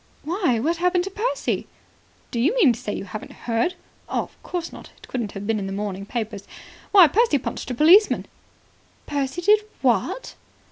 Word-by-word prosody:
"Why, 320 - 0
what 325 +8 0
happened 360 +1 +2
to 390 - -5
Percy?" 440 +6 -2 0.6
"Do 235 - -2
you 305 - +2
mean 335 - +5
to 230 - -8
say 250 -5 -4
you 200 - -4
haven't 205 +3 -8
heard? 235 +9 0 0.3
Of - - -3
course 350 -2 -5
not. - - -11
It - - -17
wouldn't 235 -6 -2
have 200 +1 -6
been 220 0 0
in 195 - -4
the - - -5
morning 200 -1 -4
papers. 215 -4 -4 0.4
Why, 380 -5 +9
Percy 430 +1 +3
punched 260 - -5
a 250 - -3
policeman." 350 - +5 0.8
"Percy 285 +4 -2
did 420 +3 +6 0.2
what?" - - 0
280 Hz, 180 wpm, -23 LUFS, 225-360 Hz, 0.8 s, Why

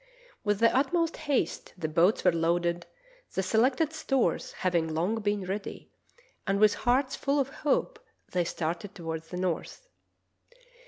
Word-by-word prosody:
With 205 -2 +1
the 230 +1 +4
utmost 330 +5 +2
haste 270 - -2
the 160 - -2
boats 170 +6 +3
were - - +5
loaded, 170 +1 0 0.5
the 190 - +1
selected 255 - +2
stores 270 -5 0
having 175 -3 0
long 180 +8 0
been 205 -2 -1
ready, 195 +2 -5 0.6
and 195 0 +1
with 215 0 +6
hearts 260 +2 +1
full 280 +1 0
of 275 -1 0
hope 300 - -1 0.3
they 180 -1 +1
started 170 +5 -3
toward 165 -3 -4
the 180 +2 -7
north. 185 - -3
205 Hz, 145 wpm, -29 LUFS, 175-265 Hz, 0.6 s, with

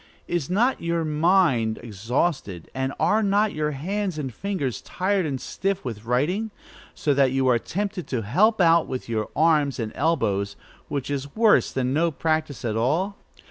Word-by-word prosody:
Is 175 -4 -2
not 235 +8 +2
your 170 -1 -1
mind 155 - +2
exhausted, 115 - -2
and 130 0 -1
are 215 +1 +3
not 205 +1 +2
your 150 0 -1
hands 185 +5 -3
and 135 -5 -4
fingers 150 - -3
tired 190 -2 0
and 135 -3 -3
stiff 195 +4 -3
with 110 -3 -6
writing, 160 - 0 0.5
so 145 - +1
that 135 -2 +3
you 135 -1 +1
are 120 -2 +4
tempted 195 - -4
to 120 -4 -2
help 205 - +3
out 170 -2 +5
with 130 -1 -5
your 110 -2 -2
arms 150 -4 +3
and 110 -2 -3
elbows, 105 -11 0 0.3
which 140 0 -3
is 140 0 -4
worse 220 -1 +4
than 130 0 -1
no 165 +3 +2
practice 155 -3 -2
at 110 -2 -1
all? 160 - 0
150 Hz, 170 wpm, -24 LUFS, 125-185 Hz, 0.5 s, out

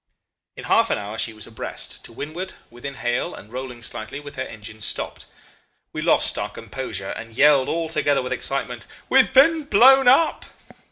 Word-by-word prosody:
"In - - -9
half - - +3
an - - +1
hour 105 +2 -6
she 115 - 0
was 110 -1 -4
abreast, 110 - -7
to - - -10
windward, 155 +10 -6 0.2
within 135 +4 -8
hail, 120 -1 -2
and 105 +4 -13
rolling 125 -2 -6
slightly, 110 +5 -4
with 145 -1 -11
her 130 - -4
engines 110 -3 -7
stopped. - - -3 0.7
We - - -4
lost - - +3
our - - -3
composure, 100 -7 -6
and 115 +1 -8
yelled 140 -1 +5
all 165 0 -1
together 145 -4 +1
with 125 - -3
excitement, 125 -6 -2 0.2
'We've 265 -1 +5
been 310 +3 +5
blown 265 +2 +6
up. 275 +6 +4
130 Hz, 175 wpm, -22 LUFS, 115-165 Hz, 0.7 s, blown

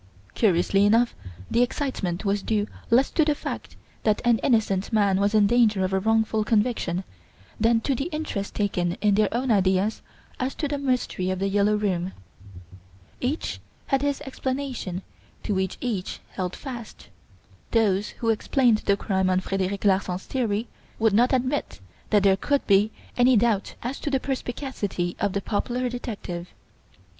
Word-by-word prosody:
Curiously 195 -1 +3
enough 230 +4 +4 0.4
the 235 - +3
excitement 230 - -1
was 200 0 +1
due 210 0 0 0.2
less 250 +4 +4
to 320 - +3
the 300 -1 +2
fact - - -6 0.3
that 215 -2 +2
an 235 -2 +4
innocent 215 -6 +1
man 200 -3 +3
was 200 +2 +2
in 210 -1 +6
danger 215 -3 +3
of 185 - -3
a 190 - +3
wrongful 220 +1 +2
conviction 210 -5 0 0.6
than 225 +1 +3
to 275 - 0
the 275 +2 -2
interest 305 - -4
taken 180 -4 0
in 205 +2 +1
their 210 0 +3
own 245 +2 0
ideas 190 +1 +2 0.4
as 255 +1 -2
to 300 - -2
the 285 0 -2
Mystery 250 -9 -1
of 185 - -1
"The 195 +1 0
Yellow 205 +1 +3
Room". 190 -3 -1 1.1
Each 270 +6 -2 0.3
had 270 -2 +1
his 285 -1 -1
explanation 260 -8 -4 0.4
to 210 - -1
which 190 -1 -1
each 215 -7 -3
held 180 -1 -3
fast. 240 - -8 0.6
Those 210 -3 +2
who 230 - -1
explained 235 0 +2
the 200 -1 +1
crime 190 -2 0
on 185 0 +3
Frederic 195 +1 -2
Larsan's 190 -2 +1
theory 230 -3 -1 0.3
would 220 -2 +2
not 240 +4 +4
admit 260 - -1 0.3
that 205 -2 +4
there 195 -1 +5
could 285 +7 0
be 200 +1 +4 0.3
any 245 0 +5
doubt 210 -3 +1
as 250 +4 -3
to - - -3
the 270 -2 +1
perspicacity 245 -9 -3
of 200 -2 0
the 200 - -1
popular 245 +5 -1
detective. 200 -8 -6
215 Hz, 160 wpm, -25 LUFS, 195-245 Hz, 1.1 s, in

